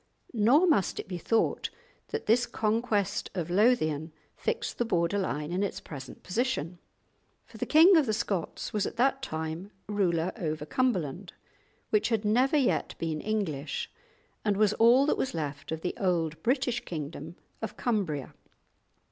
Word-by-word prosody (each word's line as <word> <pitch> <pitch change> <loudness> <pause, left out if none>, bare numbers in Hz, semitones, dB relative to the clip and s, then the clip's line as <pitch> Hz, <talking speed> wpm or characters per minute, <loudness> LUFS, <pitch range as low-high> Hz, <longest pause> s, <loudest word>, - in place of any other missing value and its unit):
Nor 245 - +5
must 300 - +2
it - - -5
be 180 -2 -5
thought 225 +6 +1 0.4
that 445 0 -4
this 240 +3 +3
conquest 215 -2 0
of 175 -2 -3
Lothian 165 -7 +2 0.2
fixed - - -3
the - - +3
border 180 -2 +1
line 150 -4 -2
in 180 +2 0
its 200 - -2
present 135 -4 -10
position, 185 - -2 0.7
for - - -14
the - - -2
king 335 +5 +7
of 310 -5 +4
the - - +2
Scots 205 -5 -3
was 210 -2 +1
at - - -7
that 270 +2 +2
time 160 -4 -4 0.2
ruler 185 -4 +1
over 155 -6 -3
Cumberland, 185 - -1 0.6
which 425 - +2
had 225 -2 0
never 255 +8 +3
yet 185 - +1
been 160 -2 -2
English 160 -10 -2 0.5
and 205 -2 +1
was 210 0 +4
all 240 +4 +5
that 300 - +1
was 260 - -1
left 145 -3 -4
of 160 0 -3
the 180 - -2
old 165 -4 0
British 250 -1 0
kingdom 155 0 -6 0.3
of 220 - -5
Cumbria. 190 - -1
200 Hz, 155 wpm, -29 LUFS, 160-240 Hz, 0.7 s, king